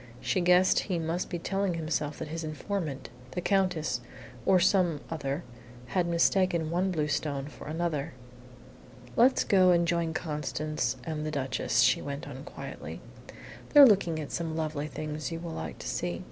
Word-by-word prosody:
She 185 - 0
guessed 180 +1 +5
he 185 -4 -2
must 165 +2 -2
be 175 - -2
telling 195 +1 -1
himself 155 -2 -2
that - - -6
his 165 +1 -4
informant 155 -2 -4 0.2
the - - -2
Countess, 180 -10 +1 0.5
or 190 -1 +6
some 180 -4 +3
other 145 0 -3 0.5
had 180 -2 +1
mistaken 170 -1 +2
one 180 +3 +1
blue 155 -5 0
stone 145 -2 -1
for 145 - -10
another. 155 -3 -2 1.0
"Let's 250 +3 +5
go 185 -2 +5
and 170 -1 +4
join 170 -2 0
Constance 150 -4 -2
and 155 -2 -3
the 155 - -2
Duchess," 135 -4 0
she - - +4
went 140 0 -5
on, 135 -1 -8
quietly. - - -8 0.7
"They're 290 -1 +11
looking 185 -8 +3
at 150 - -6
some 165 -2 -3
lovely 155 -2 -2
things 155 +1 -5
you 165 - -4
will 170 0 -6
like 80 - -5
to - - -7
see. - - -2
165 Hz, 165 wpm, -29 LUFS, 150-180 Hz, 1.0 s, They're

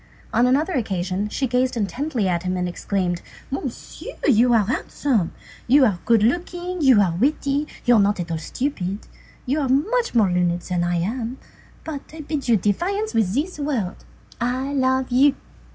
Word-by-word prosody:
On 245 - +4
another 300 +8 +2
occasion 195 - -1
she 270 - -1
gazed 250 0 0
intently 230 - -1
at 175 -2 0
him 185 0 -2
and 180 0 -1
exclaimed:— 175 0 -2 0.3
"Monsieur, 270 - -6
you 245 -2 +5
are 225 -4 +4
handsome, 235 -3 -1 0.4
you 270 +2 +6
are 200 -7 +1
good 230 -3 +4
looking, 350 +6 -1
you 260 -7 +6
are 190 -4 +3
witty, 280 - 0 0.2
you 245 - +5
are 225 - +6
not 205 -1 +2
at 170 -1 -4
all 165 - -2
stupid, 200 - -3 0.4
you 280 +4 0
are 270 - -1
much 420 - +1
more 210 -5 +4
learned 175 0 +1
than 180 -1 -1
I 175 0 0
am, 230 +8 -2 0.5
but 295 -3 -5
I 320 - -7
bid 290 -3 -4
you 230 - +5
defiance 375 - -1
with 215 -3 +1
this 305 +4 -2
word: 255 -11 -2 0.4
I 255 +4 -1
love 260 -1 +1
you!" 270 +3 +5
245 Hz, 175 wpm, -22 LUFS, 195-280 Hz, 0.5 s, you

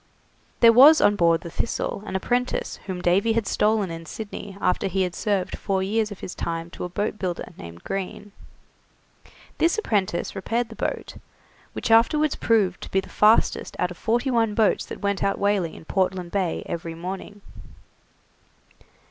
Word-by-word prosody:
There 230 -1 +8
was 290 +6 +8
on 205 - +4
board 170 -3 +3
the 170 - -8
'Thistle' 200 - -3
an - - -5
apprentice 245 +6 -1
whom 180 -2 -4
Davy 195 +6 +3
had 225 -2 0
stolen 210 -2 +1
in 165 0 -8
Sydney 200 0 -7
after 180 +1 +1
he 190 0 0
had 180 -1 -2
served 200 -2 -1
four 190 -2 -1
years 215 +2 0
of 205 - -10
his - - -6
time 165 0 -4
to - - -7
a - - -5
boat 205 +4 -3
builder 180 -2 -4
named 85 0 -11
Green. 195 +1 -5 1.3
This 335 +5 +3
apprentice 200 - -1
repaired 230 +5 -2
the 225 - -10
boat, - - -4 0.6
which - - -3
afterwards 295 +7 +4
proved 215 -5 +1
to - - -7
be 190 - +2
the 190 -1 -7
fastest 215 +4 +3
out 180 0 0
of 175 - -9
forty 240 +4 0
one 225 -3 +1
boats 220 -3 +2
that - - -8
went 200 -1 0
out 195 - +1
whaling 200 -5 0
in - - -12
Portland 185 -1 -1
Bay 190 -4 -1
every 165 -1 -5
morning. 190 +4 -7
195 Hz, 175 wpm, -24 LUFS, 180-225 Hz, 1.3 s, There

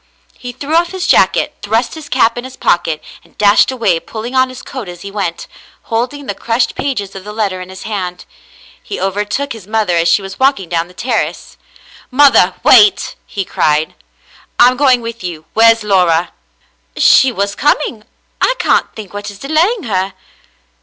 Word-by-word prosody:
He 245 - -8
threw 280 +5 -6
off 340 +2 +2
his 370 -1 -3
jacket, - - +3
thrust 225 +4 -1
his 315 -2 -10
cap 230 -4 +2
in 240 - -5
his 260 0 -10
pocket, 165 -3 0 0.2
and - - -26
dashed 205 0 +4
away, 220 -10 +1
pulling 225 +7 -7
on 260 0 +3
his 255 - -10
coat 255 -8 -7
as 175 0 -10
he 200 - -7
went, 190 -5 -3 0.4
holding 250 +5 -3
the 200 - -3
crushed 230 +4 -1
pages 210 -9 -3
of 190 - -8
the 210 - -8
letter 205 -4 -2
in 185 - -9
his 190 0 -10
hand. 185 -5 -5 0.6
He 405 - -6
overtook 210 +8 -2
his 215 -5 -12
mother 215 -5 0
as 170 0 +2
she 195 +4 +3
was 195 0 -9
walking 260 -10 +1
down 170 0 -1
the 180 - -18
terrace. 230 +1 -3 0.3
" - - -22
Mother, 255 -9 +4
wait," 210 -5 +5
he 195 -2 -4
cried, 155 -1 0 0.6
"I'm 250 +1 +6
going 255 -2 +3
with 230 -2 -7
you, 165 -3 -6
Where's 225 0 +5
Laura? 180 -4 +2 0.4
" - - -41 0.2
"She 265 - +5
was 200 -2 -2
coming. 260 -4 0 0.4
I - - +2
can't - - +1
think 210 -4 -9
what 205 0 -6
is 205 - -11
delaying 325 - 0
her." 190 -3 -2
215 Hz, 185 wpm, -15 LUFS, 190-255 Hz, 0.6 s, I'm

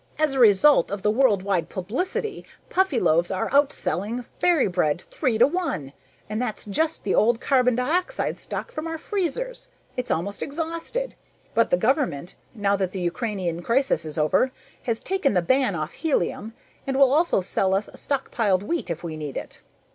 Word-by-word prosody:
"As 305 -2 +2
a 270 - -1
result 230 - +6
of 200 0 -5
the 210 - +3
worldwide 200 - +2
publicity, 360 - -3 0.3
Puffyloaves 235 - +2
are 190 - -2
outselling 245 - +1
Fairy 345 -5 +4
Bread 175 -4 0
three 255 -7 0
to 235 - +7
one 260 - -2 0.3
and 215 +2 -3
that's 245 -4 -3
just 315 +10 -1
the 195 - 0
old 230 +1 +3
carbon 250 -3 +3
dioxide 350 - -1
stock - - -5
from 310 +1 -5
our 325 0 -3
freezers! 420 - -3 0.3
It's 250 - -3
almost 200 +5 -2
exhausted, 330 - -3 0.4
but 230 - +3
the - - +3
government, 215 - 0 0.2
now 200 -2 +1
that 190 -2 -2
the 190 - -3
Ukrainian 175 -2 -2
crisis 265 +8 +1
is 155 -1 -7
over, 155 - +2 0.3
has 230 -2 -1
taken 375 - 0
the 180 - +4
ban 260 -1 +2
off 155 -2 -4
helium 230 - -1 0.3
and 270 -1 0
will 270 -1 +5
also 325 - +3
sell 190 +1 +1
us 200 +2 -1
stockpiled 225 -8 0
wheat 335 - -2
if 170 0 -4
we 165 -2 -4
need 150 -3 -5
it. - - -7
230 Hz, 170 wpm, -24 LUFS, 185-295 Hz, 0.4 s, to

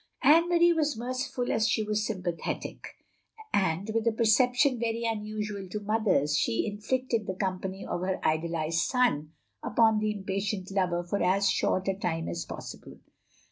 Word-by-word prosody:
Anne 325 +5 +6
Marie 345 0 +5
was 305 -5 0
merciful 255 +1 -3
as 220 0 +2
she 215 - +1
was 210 0 -1
sympa 185 -5 -3
thetic, - - -5 0.7
and, 190 +2 +1
with 225 0 0
a - - +5
perception 245 +4 +3
v6ry 230 0 -1
unusual 210 -2 -3
to 210 - -3
mothers, 205 -9 +1
she 115 -5 +1
inflicted 220 +2 -2
the 190 - -3
company 190 0 -3
of 175 - -3
her 185 0 -1
idol 160 +2 +1
ised 165 0 0
son 235 - +1 0.3
upon 220 -2 +3
the 215 0 0
impatient 195 -1 -3
lover 180 -3 0
for 190 +4 -2
as 190 +3 +3
short 185 +1 0
a 195 - +2
time 165 -4 -3
as 85 0 -4
possible. - - -9
210 Hz, 165 wpm, -28 LUFS, 185-230 Hz, 0.7 s, Anne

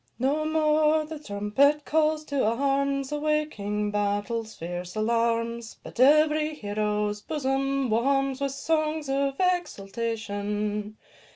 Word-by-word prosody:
No 285 +5 0
more 310 0 +3
the 310 0 -7
trumpet 275 +6 +1
calls 310 0 +1
to 285 -2 -1
arms, 275 +4 0
Awaking 295 -9 -1
battle's 205 +2 -2
fierce 175 +2 -6
alarms, 230 +1 0
But - - -11
every 305 +3 +4
hero's 210 -2 -2
bosom 275 -1 -1
warms 270 +4 +1
With 275 -1 -1
songs 310 0 -1
of 275 0 0
exultation. 210 - -2
270 Hz, 105 wpm, -26 LUFS, 210-300 Hz, -, every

